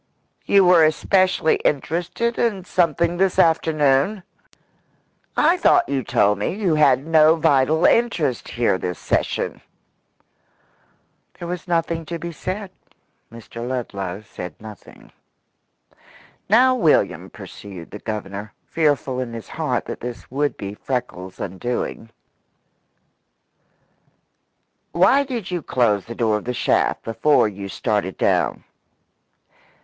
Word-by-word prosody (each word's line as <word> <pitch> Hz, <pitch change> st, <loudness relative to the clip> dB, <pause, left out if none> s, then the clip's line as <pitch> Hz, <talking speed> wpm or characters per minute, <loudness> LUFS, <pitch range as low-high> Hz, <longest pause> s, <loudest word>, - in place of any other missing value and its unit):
"You 195 Hz, -2 st, +5 dB
were 175 Hz, -2 st, +6 dB
especially 185 Hz, +2 st, +2 dB
interested 175 Hz, -, -1 dB
in 205 Hz, -6 st, 0 dB
something 170 Hz, -1 st, +1 dB
this 190 Hz, 0 st, +1 dB
afternoon? 160 Hz, +3 st, +2 dB, 1.1 s
I 335 Hz, +4 st, +4 dB
thought 355 Hz, -, +3 dB
you 140 Hz, -1 st, -1 dB
told 105 Hz, -4 st, +2 dB
me -, -, -2 dB
you 195 Hz, -6 st, 0 dB
had 140 Hz, -3 st, +3 dB
no 160 Hz, 0 st, +5 dB
vital 160 Hz, 0 st, +2 dB
interest 170 Hz, -, +1 dB
here 115 Hz, -5 st, 0 dB
this 90 Hz, -1 st, -4 dB
session." -, -, -2 dB, 1.8 s
There 170 Hz, -, -7 dB
was 180 Hz, +1 st, -5 dB
nothing 165 Hz, -1 st, -1 dB
to 170 Hz, -, -4 dB
be 170 Hz, +1 st, -6 dB
said. 185 Hz, +5 st, -5 dB, 0.6 s
Mr. 115 Hz, +1 st, -8 dB
Ludlow 100 Hz, -7 st, -4 dB
said 90 Hz, -5 st, -8 dB
nothing. 105 Hz, -3 st, -13 dB, 1.4 s
"Now, 250 Hz, +5 st, +5 dB
William," 195 Hz, -12 st, +1 dB
pursued 95 Hz, -5 st, -11 dB
the 105 Hz, -, -8 dB
Governor, 105 Hz, -1 st, -6 dB
fearful 145 Hz, -5 st, 0 dB
in 125 Hz, -2 st, -4 dB
his 115 Hz, -2 st, -8 dB
heart -, -, -2 dB
that -, -, -6 dB
this 120 Hz, 0 st, -8 dB
would 145 Hz, 0 st, -1 dB
be 100 Hz, 0 st, -6 dB
Freckles' 105 Hz, -7 st, -5 dB
undoing, 115 Hz, +4 st, -4 dB, 2.8 s
"why 195 Hz, +11 st, +4 dB
did 240 Hz, -9 st, -5 dB
you 175 Hz, -2 st, -2 dB
close 115 Hz, -8 st, +1 dB
the 115 Hz, -, -8 dB
door 110 Hz, -2 st, +1 dB
of 105 Hz, -, -9 dB
the 125 Hz, 0 st, -3 dB
shaft -, -, +1 dB
before 115 Hz, +3 st, +2 dB
you 100 Hz, -1 st, -7 dB
started 95 Hz, -4 st, -2 dB
down?" -, -, +1 dB
145 Hz, 120 wpm, -21 LUFS, 115-175 Hz, 2.8 s, were